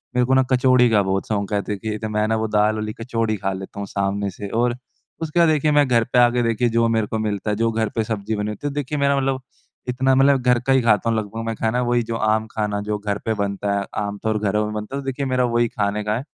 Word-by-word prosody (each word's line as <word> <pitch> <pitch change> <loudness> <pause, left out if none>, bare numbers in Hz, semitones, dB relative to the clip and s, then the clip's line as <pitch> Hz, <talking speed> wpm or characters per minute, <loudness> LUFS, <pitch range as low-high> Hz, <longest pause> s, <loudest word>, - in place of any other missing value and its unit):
मेरे 125 0 +3
को 130 - +1
ना 130 - +5
कचौड़ी 125 -1 +4
का 110 -2 +4
बहुत 95 0 -1
शौक 100 -1 -2
है। 100 - +2
देखिए, 105 +1 -3
तो 110 - -4
मैं 105 0 0
ना 110 - +1
वो 110 0 -1
दाल 105 0 +2
वाली 110 0 -3
कचौड़ी 115 -2 -2
खा 95 0 -2
लेता 95 +1 -8
हूँ 100 - -4
सामने 100 0 -1
से। 100 +2 -7
और 120 +1 +1 0.5
उसके 160 +1 -1
बाद 170 -2 +5
देखिए, 155 0 +2
मैं 145 -2 +4
घर 115 -2 +3
पे 125 - +5
आ 120 0 +6
के 120 0 0
देखिए, 115 +1 +1
जो 115 0 +2
मेरे 110 -2 +1
को 110 - -3
मिलता 105 -1 -2
है, 105 - +1
जो 115 +1 +1
घर 110 -1 -1
पे 115 - +1
सब्ज़ी 110 -1 -3
बनी 105 +1 -2
होती 105 +7 -5
है, 140 - -4
देखिए, 145 +1 -3
मेरा 140 0 +2
मतलब, 135 -1 0 0.5
इतना 130 +2 +2
मतलब, 135 0 +4
घर 125 -1 +3
का 135 - +4
ही 130 - +4
खाता 115 -1 +2
हूँ 115 - +1
लगभग 110 +1 -4
मैं 115 0 -2
खाना। 115 +3 0
वही 120 -1 +1
जो 115 0 -4
आम 110 0 +1
खाना, 105 -1 -2
जो 105 0 -2
घर 100 -1 -2
पे 110 - +1
बनता 100 -1 -2
है, 100 - -3 0.2
आम 100 0 -4
तौर 110 0 +1
घरों 105 +1 0
में 105 - -4
बनता 105 +5 -5
है। 140 - -3
तो 135 - -13
देखिए, 135 +1 -2
मेरा 130 -1 +1
वही 120 0 +3
खाने 105 0 -2
का 105 +1 0
है। 130 - -5
110 Hz, 285 wpm, -21 LUFS, 105-125 Hz, 0.5 s, आ